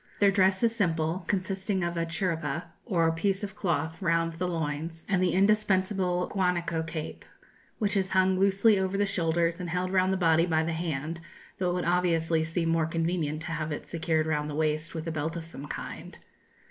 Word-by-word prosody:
Their 200 -1 +5
dress 190 +1 +3
is 230 -1 +3
simple, 170 -3 0
consisting 190 0 -1
of 170 0 -2
a 165 0 -1
'chiripa' 165 -2 -2 0.2
or 165 -6 +2
piece 190 +4 -1
of 200 -1 -4
cloth 165 -2 -2
round 165 -2 +1
the 180 - 0
loins, 165 0 -3
and 190 -2 +1
the 180 -2 +2
indispensable 190 -2 +2
guanaco 175 -4 0
cape, 160 -1 -6 0.5
which 210 -2 0
is 190 -1 +1
hung 185 0 +3
loosely 200 +2 +4
over 190 +1 -1
the 205 - +2
shoulders 170 -2 0
and 180 -1 -4
held 180 +2 -1
round 185 0 +3
the 190 - +1
body 165 -1 +3
by 160 -1 +2
the 165 +1 -2
hand, 160 0 -3 0.4
though 180 -1 +1
it - - 0
would 180 - -1
obviously 170 -2 +2
seem 165 +1 -1
more 165 -1 +2
convenient 165 -2 -1
to 165 - -5
have 155 -1 -3
it 145 - -4
secured 160 -2 0
round 150 -1 -1
the 145 - -4
waist 155 +1 -1
with 160 0 -4
a 165 - -2
belt 160 +2 -2
of 165 - -6
some 145 -3 -7
kind. - - -7
170 Hz, 200 wpm, -28 LUFS, 160-190 Hz, 0.5 s, Their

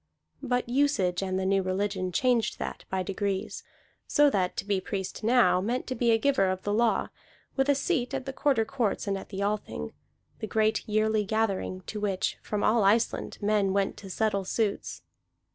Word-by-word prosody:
But 250 -3 -1
usage 240 -9 +1
and 190 -1 -1
the 190 - -1
new 195 0 +3
religion 185 0 -1
changed 245 +2 +1
that - - -6
by 190 -1 -1
degrees; 195 0 -3 0.4
so 290 -1 +4
that 185 -5 0
to - - -3
be 200 -2 0
priest 190 +2 -5
now 225 -6 +4
meant 240 +6 -1
to 255 - -3
be 240 -2 +1
a 225 - +5
giver 225 -5 +2
of 185 0 -3
the 205 - -1
law, 230 +1 +2 0.5
with 270 +1 +1
a 285 - +5
seat 275 -4 0
at 260 - -4
the 270 - -5
Quarter 265 -6 +2
Courts 235 -4 -1
and 200 -1 0
at 195 - -7
the 200 0 -3
Althing, 200 - -3 0.5
the 220 - -4
great 220 0 +1
yearly 215 0 +2
gathering 205 -3 -1
to 210 +3 -6
which 195 -3 -1
from 210 -1 -3
all 220 0 +3
Iceland 220 +4 +1
men 205 -2 +2
went 200 -1 0
to 195 - -10
settle 200 0 0
suits. 205 +2 -2
210 Hz, 190 wpm, -28 LUFS, 195-235 Hz, 0.5 s, a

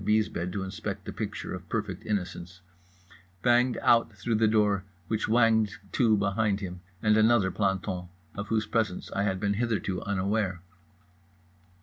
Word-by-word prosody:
's 110 0 +3
bed 90 -2 -3
to 95 +1 -3
inspect 95 -1 -5
a - - -4
picture - - -4
of - - -8
perfect - - -3
innocence) 90 -3 -3 0.8
banged 125 +1 +4
out 115 -1 +4
through 120 - -2
the 110 0 +4
door 105 -3 +2 0.2
which 110 -1 -1
whanged 110 -3 +3 0.2
to 110 -4 +3
behind 100 0 +1
him 90 -3 -6 0.2
and 110 -1 +4
another 110 -3 +4
planton, 95 -2 -1 0.3
of 100 +1 -5
whose 110 0 +1
presence 110 -4 -1
I 100 - -1
had 95 -2 0
been 100 0 +1
hitherto 105 -4 -1
unaware. 100 -2 -1
105 Hz, 150 wpm, -28 LUFS, 95-110 Hz, 0.8 s, banged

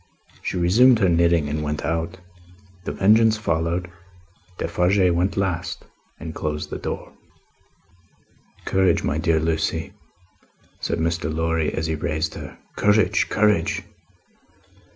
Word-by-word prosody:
She - - -3
resumed 115 +9 +5
her 95 -4 +2
knitting 85 -2 +3
and 75 +1 -2
went 75 0 -3
out. 85 +2 -2 0.7
The - - -2
Vengeance 110 +2 +4
followed. 85 -2 -1 0.7
Defarge 90 +2 +2
went 90 +4 0
last, 95 -4 -2 0.3
and 80 +2 -7
closed 75 -1 -4
the - - -4
door. - - -5 1.5
"Courage, 95 -1 +2
my 75 - -1
dear 80 -1 +2
Lucie," 80 0 -1 0.9
said - - -2
Mr. 85 0 -1
Lorry, 80 0 0
as 80 - -3
he 80 - -1
raised 80 +1 -2
her. - - -9 0.2
"Courage, 105 0 +2
courage! 105 -1 +1
85 Hz, 120 wpm, -23 LUFS, 80-95 Hz, 1.5 s, resumed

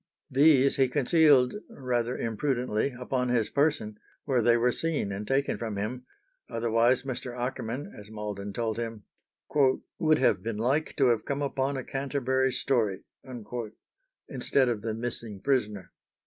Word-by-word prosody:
These 140 0 +5
he 135 -1 +4
concealed 145 -1 +4 0.2
rather 125 - -2
imprudently 125 +1 -1
upon 125 0 -1
his 115 -3 +1
person, 140 -8 0 0.3
where 130 -4 +2
they 120 +1 +4
were 125 +1 +3
seen 155 -8 -1
and 100 +2 -5
taken 135 +1 0
from 110 -3 -4
him, 125 +5 -4 0.4
otherwise 115 +2 +2
Mr. 125 -2 -5
Akerman, 125 +2 -3
as 105 0 -12
Malden 105 -2 -5
told 110 +1 -2
him, 115 -3 -5 1.0
"would 155 -1 +4
have 100 -9 +2
been 115 +1 -4
like 135 +8 0
to 135 -4 +4
have 115 -2 +1
come 140 +1 -2
upon 135 0 -1
a 130 - -4
Canterbury 130 -1 0
story" 115 -7 0 1.2
instead 130 -3 +1
of 115 -3 -2
the 110 0 -3
missing 115 -3 -4
prisoner. 105 - -1
125 Hz, 145 wpm, -28 LUFS, 110-135 Hz, 1.2 s, These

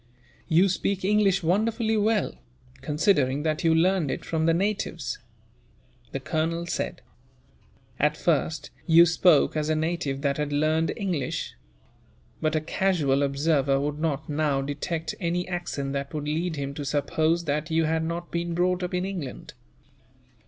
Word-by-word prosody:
"You 175 +3 +4
speak 190 +1 -1
English 195 -2 +3
wonderfully 220 +6 +1
well, 215 -1 +1 0.5
considering 145 -3 +1
that 155 0 -1
you 165 -1 +4
learned 175 -2 +2
it - - -4
from 160 0 0
the 165 - +4
natives," 195 -4 -2 0.9
the 135 - -3
colonel 165 +4 -1
said. 170 - -3 1.0
"At 150 +1 +2
first, 160 -1 0 0.2
you 170 0 +8
spoke 170 -3 +4
as 155 0 -1
a 155 - +2
native 155 -3 -2
that 140 -1 0
had 150 -1 -2
learned 155 +2 +1
English; 185 - -2 0.9
but 155 0 +1
a 155 - +1
casual 155 -5 +1
observer 140 -1 +2
would 145 +1 -2
not, 155 -2 -1
now, 145 -2 0
detect 155 +3 -3
any 175 0 -1
accent 160 -6 -3
that 140 +2 -4
would 150 -1 -3
lead 160 +2 -1
him 140 -1 -4
to 145 - -5
suppose 155 +4 +1
that 150 +2 -1
you 160 0 +2
had 160 +1 0
not 170 +1 -4
been 170 0 -2
brought 180 +1 +1
up 180 0 -2
in 180 +1 0
England. 175 -9 -6
160 Hz, 150 wpm, -26 LUFS, 145-175 Hz, 1.0 s, you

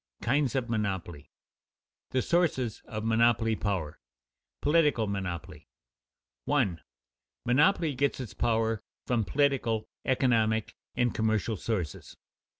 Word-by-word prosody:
KINDS 135 +1 +1
OF 130 -3 0
MONOPOLY 100 -8 -2
[Sidenote: - - -65
The 130 - +1
sources 130 - +1
of 110 -1 -5
monopoly 115 -1 +3
power] 95 -8 -2
[Sidenote: - - -63
Political 150 -7 +3
monopoly] 95 -4 -5 0.8
1. 100 - +1 0.7
_Monopoly 150 +3 +3
gets 140 +2 0
its 125 -4 -6
power 115 -2 +1 0.2
from 120 -3 +1
political, 130 -3 +1 0.2
economic, 115 -4 +2 0.2
and 120 -1 +1
commercial 110 0 0
sources. 95 -7 -4
115 Hz, 110 wpm, -29 LUFS, 100-130 Hz, 0.8 s, monopoly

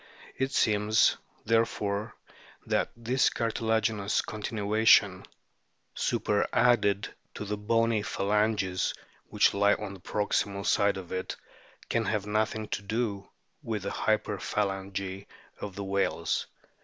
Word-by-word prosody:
It 135 0 -1
seems, 110 -2 +3 0.3
there 115 +1 +4
fore, 105 -1 -3 0.5
that - - +1
this 120 +3 +2
cartilaginous 110 -2 0
continuation, 110 0 +2 0.7
superadded 105 -4 +1 0.2
to 105 - -5
the 105 +1 -2
bony 115 +1 +1
phalanges 100 -2 0 0.3
which - - +3
lie 100 +1 +4
on 100 - -6
the 95 - -11
proximal 100 0 -1
side 100 -1 +3
of 90 -3 -8
it, 95 0 -3 0.5
can 115 -1 0
have 105 -1 -1
nothing 110 +1 -1
to - - -2
do 100 -1 -2 0.3
with 110 -7 -3
the 100 - -3
hyper 110 0 0
phalangy 95 -1 -3 0.3
of 100 -2 -6
the 100 - -4
whales. 100 0 -1
105 Hz, 120 wpm, -29 LUFS, 100-110 Hz, 0.7 s, there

